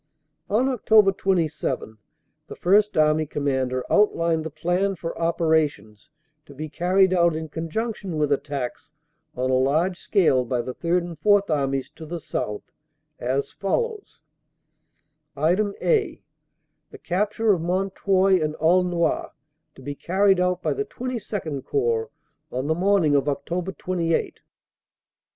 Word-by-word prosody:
"On 220 +5 +2
Oct. 220 -6 +4
27 160 - -1 0.5
the - - -8
First 205 +2 +3
Army 155 0 +3
Commander 130 -3 -1
outlined 165 -6 +2
the 160 - -4
plan 180 +5 -1
for 165 -1 -5
operations 155 -9 0 0.4
to 140 - -13
be 155 +3 -6
carried 185 +5 +2
out 170 -2 +3
in 160 0 -5
conjunction 185 +3 -4
with 150 -1 0
at 140 - +1
tacks 140 +1 -5 0.4
on 130 +1 -1
a 130 - +3
large 160 +7 +1
scale 160 - +2
by 120 0 -2
the 130 - -5
Third 175 +4 0
and 170 -3 -8
Fourth 205 +1 +3
Armies 135 -3 0
to 160 - -11
the 170 +2 -5
south 105 -7 -4 0.6
as 130 +3 -1
follows: 425 - -3 1.1
"(a) 155 +4 +3 1.4
The - - -12
capture 210 +4 +1
of 175 - -2
Mount 185 +3 -1
Houy 190 -2 +3
and 155 0 -2
Aulnoy 175 +1 +1 0.5
to - - -14
be 145 - -4
carried 190 +5 +2
out 180 0 0
by - - +1
the 420 +1 -3
XXII 210 - -4
Corps 120 -4 -1 0.4
on 130 +2 -3
the 160 - +1
morning 180 -3 +2
of 140 -2 +3
Oct. 175 +6 -3
28.. 170 -3 -1
165 Hz, 135 wpm, -24 LUFS, 145-190 Hz, 1.4 s, Oct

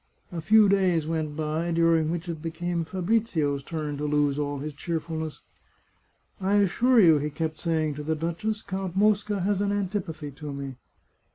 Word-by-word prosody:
A 170 -2 -4
few 215 +6 +6
days 185 -5 +2
went 155 -2 -2
by, 155 +2 -1
during 165 -1 +3
which 170 +1 -3
it 165 -3 -5
became 170 +1 -2
Fabrizio's 175 -6 0
turn 150 0 -4
to 150 - -3
lose 145 -1 +1
all 145 -1 -2
his 150 +2 -5
cheerfulness. 160 0 -4 0.5
" - - -42 0.2
I 195 +2 +2
assure 230 +5 +4
you," 165 -7 +7
he 150 +1 -2
kept 155 +1 -3
saying 160 -3 0
to 150 +1 -6
the 160 +1 0
duchess, 170 +7 -2
" - - -32
Count 190 -2 -3
Mosca 205 -1 +2
has 200 +1 +1
an 200 0 +1
antipathy 180 -7 -3
to 145 +1 -7
me." 140 -1 -6
165 Hz, 180 wpm, -26 LUFS, 150-190 Hz, 0.5 s, you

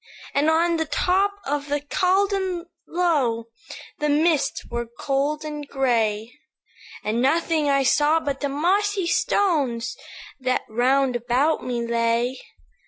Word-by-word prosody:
"And 290 +3 +2
on 335 +1 +2
the 320 - 0
top 375 +6 +1
of 285 +1 -2
the 290 0 0
Caldon 370 +3 0 0.2
Low 275 -10 0 0.5
The 300 -1 0
mists 310 +1 +1
were 235 0 -4
cold 290 +2 -1
and 295 -1 -6
gray, 230 -5 0 0.7
And 220 +3 0
nothing 310 +2 +1
I 275 -1 +3
saw 295 +5 +3
but 280 -3 -3
the 285 - -2
mossy 380 +7 +1
stones 330 - +1 0.4
That 255 -1 0
round 255 +3 +2
about 245 +6 +1
me 240 -2 -2
lay. 235 +2 0
290 Hz, 125 wpm, -23 LUFS, 245-335 Hz, 0.7 s, I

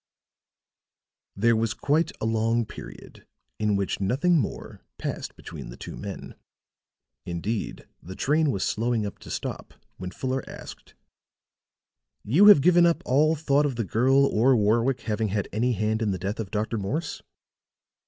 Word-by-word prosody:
There 115 +3 +3
was 110 0 0
quiet 155 +4 +1
a - - -2
long 115 +1 +1
period - - -12 0.3
in 105 -1 +1
which 100 -1 -1
nothing 140 - +2
more 110 - -5 0.2
passed - - -5
between - - -9
the - - -10
two - - -8
men. 100 -1 -7 0.9
Indeed 95 +6 -4
the 95 +3 -9
train 150 +6 +2
was 100 -7 -1
slowing 115 -1 0
up 100 - -7
to - - -12
stop - - -5 0.2
when 90 0 -5
Fuller 130 +5 -3
asked: - - -11 1.3
"You 165 - +5
have 205 -9 +9
given 175 +2 +5
up 170 - 0
all 150 +5 +3
thought 145 -1 +2
of 135 - -4
the 115 -2 -2
girl 130 +8 +3
or 130 +1 +3
Warwick 115 +4 +2
having 110 0 -1
had 100 -1 -2
any 120 +4 +1
hand 110 +2 -1
in 110 - +1
the 95 - -1
death 100 +5 -4
of 105 -4 -4
Dr. 110 +2 -2
Morse?" 145 - -3
115 Hz, 155 wpm, -26 LUFS, 105-140 Hz, 1.3 s, have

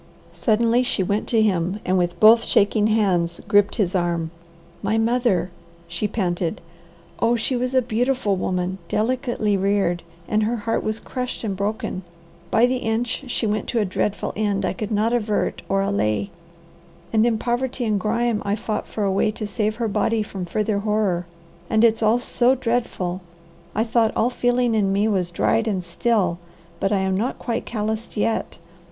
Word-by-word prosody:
Suddenly 230 +2 +2
she 250 -6 0
went 200 +3 -1
to 225 -2 +3
him 185 -1 0
and 185 - +1
with 175 -1 0
both 225 +2 +7
shaking 210 +1 +3
hands 185 -6 +1
gripped 205 0 +3
his 190 -5 0
arm. 170 -3 0 0.5
"My 210 +2 0
mother!" 225 -5 +1 0.4
she 170 +5 -2
panted. 175 -5 -2 0.6
"Oh 230 +1 +3
she 235 +3 -1
was 250 +1 -1
a 260 - +4
beautiful 240 -2 0
woman, 185 0 -2
delicately 230 -1 0
reared, 195 -3 +1 0.3
and 215 0 +1
her 220 +3 +1
heart 225 0 -1
was 215 +1 -2
crushed 250 -2 -5
and 205 -3 -2
broken. 200 -1 -3 0.5
By 225 +2 +4
the 255 +1 +1
inch 230 +3 -2
she 245 - -1
went 210 -1 -1
to 235 - 0
a 210 - +2
dreadful 200 +2 -2
end 205 -2 0
I - - 0
could 210 +2 -5
not 220 +2 +1
avert 215 -3 0
or 195 0 +2
allay, 195 - 0 0.8
and 220 -1 +4
in 235 -1 +2
poverty 245 +2 -1
and 210 -2 +1
grime 230 +2 0
I 200 0 0
fought 215 0 -3
for 215 - -3
a 195 - +1
way 195 +2 +2
to 215 0 -4
save 215 +1 -1
her 230 0 -1
body 215 +2 +1
from 195 -3 -6
further 210 +3 -1
horror, 200 -4 0 0.4
and 220 0 +3
it's 225 -1 +4
all 220 +2 +4
so 245 +1 +2
dreadful 230 -7 -2 0.5
I 220 - +2
thought 225 -1 +1
all 240 +3 +2
feeling 245 -1 +1
in 205 -3 +2
me 200 +2 +2
was 190 -5 0
dried 220 +6 +1
and 190 -4 -1
still, 180 -1 0 0.4
but 195 - 0
I 205 - +3
am 190 0 0
not 230 +7 -1
quite 235 -2 -3
calloused 220 0 -3
yet. 220 +2 -1
215 Hz, 180 wpm, -22 LUFS, 195-230 Hz, 0.8 s, both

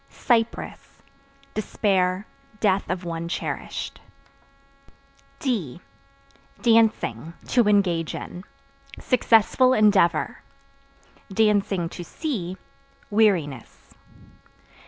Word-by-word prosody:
Cypress 230 -1 -2 0.5
Despair, 190 -2 0 0.3
death 195 -2 +1
of 180 0 -2
one 165 0 -4
cherished. 170 - -5 1.4
D 210 - -2 0.8
Dancing 220 - +2
(To 240 -4 +3
engage 180 -6 +2
in) 180 - -7 0.6
successful 255 +1 +3
endeavor; 205 -5 +3 0.9
(to 195 -5 +1
see) 190 - -4 0.5
weariness. 180 - 0
195 Hz, 65 wpm, -24 LUFS, 170-225 Hz, 1.4 s, To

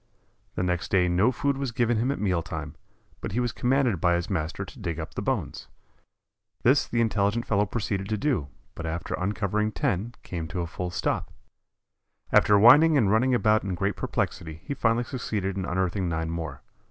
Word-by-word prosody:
The - - -1
next 90 -2 -1
day 90 -2 +3
no 95 +8 +3
food 140 +2 -1
was 135 -3 -2
given 120 0 +1
him 120 +4 +1
at 140 - -1
meal 95 -5 0
time, - - -6 0.5
but - - -5
he 120 - 0
was 120 -1 0
commanded 125 - +1
by 85 -1 +3
his 85 +3 -3
master 90 +2 -2
to 110 - -13
dig 85 -6 -3
up 80 - -6
the - - -4
bones. - - -3 1.0
This 135 +4 +4
the 120 - 0
intelligent 105 +1 +1
fellow 105 -1 +1
proceeded 100 -2 -3
to 110 - 0
do, 120 - 0 0.3
but 85 - -6
after 80 +1 -4
uncovering 105 +2 -1
ten 120 - -2
came 85 -3 -5
to 90 +2 -3
a - - -2
full 90 +2 -5
stop. 90 - -2 1.0
After 105 - +6
whining 145 +9 +7
and 105 -7 +3
running 125 +4 +3
about 110 -2 +3
in 95 -2 -2
great 100 +3 -1
perplexity 80 -1 -3
he - - -3
finally 115 -2 +1
succeeded 105 -7 -3
in 95 -2 -2
unearthing 95 0 -1
nine 80 0 -2
more. 80 -5 -5
100 Hz, 190 wpm, -26 LUFS, 90-120 Hz, 1.0 s, whining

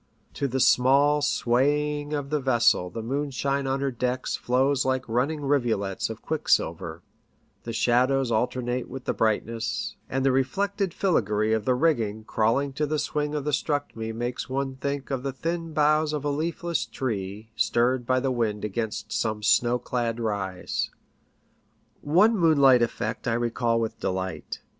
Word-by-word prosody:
To 140 - -1
the 130 +1 -2
small 140 +4 +4
sway 145 +2 +1
ing 145 0 -8
of 145 -1 -3
the 150 - +1
vessel 120 -8 +3
the 115 +4 -6
moonshine 140 +1 -1
on 135 +1 -1
her 140 -1 0
decks 125 +1 -2
flows 130 +2 +1
like 130 0 -1
running 135 +7 0
rivulets 115 -9 0
of - - -8
quicksilver; 85 +1 0 0.6
the 115 - -4
shadows 125 +3 +2
alternate 125 +2 -1
with 135 -1 -8
the - - 0
brightness, 110 +1 -1
and 135 0 -1
the 135 - +4
reflected 195 +9 0
filigree 110 - +1
of 110 -2 0
the 130 - +3
rigging 115 -8 +1
crawling 115 +6 +1
to 150 +2 -1
the 155 +1 -1
swing 150 0 -2
of 145 -2 -3
the 150 - 0
structm'e 135 -5 -2
makes 120 +3 -4
one 135 0 -2
think 140 +1 -3
of 135 -2 -1
the 135 +1 -2
thin 165 +4 -3
boughs 155 0 +2
of 145 -1 -3
a 145 - +1
leafless 170 +3 -2
tree 110 -3 -4
stirred 120 +4 +1
by 130 0 +3
the 135 0 0
wind 110 -4 -1
against 110 +1 -4
some 110 -2 -1
snow 120 +2 +3
clad 120 -1 -2
rise. 100 -5 -2 1.1
One 185 +10 +4
moonlight 140 - +5
effect 120 +2 -2
I 115 - +2
recall 120 0 0
with 115 -1 -3
delight. 95 -3 -4
130 Hz, 160 wpm, -26 LUFS, 115-145 Hz, 1.1 s, moonlight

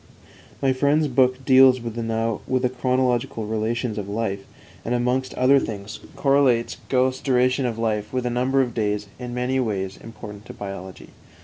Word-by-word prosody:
"_ - - -30 0.6
My 135 -1 +3
friend's 145 +4 +2
book 130 0 +2
deals 130 -1 +6
with 115 -1 -5
the 115 +2 -1
chronological 125 -2 0
relations 110 +1 -2
of 100 -1 -6
life, 100 -2 -2 0.4
and, 120 - -1
amongst 125 +2 -1
other 135 +2 +5
things, 105 -2 -6 0.2
correlates 135 -4 +2
Goethe's 130 0 +1
duration 130 0 +2
of 115 -2 -4
life 110 -2 -1
with 125 -1 -2
a 125 - 0
number 130 +2 +2
of 120 -2 -5
days 105 -2 -1
in 125 -1 -6
many 125 +2 0
ways 100 -6 -2
important 105 -1 -10
to - - -8
biology. 95 -2 -8
120 Hz, 165 wpm, -23 LUFS, 110-130 Hz, 0.6 s, deals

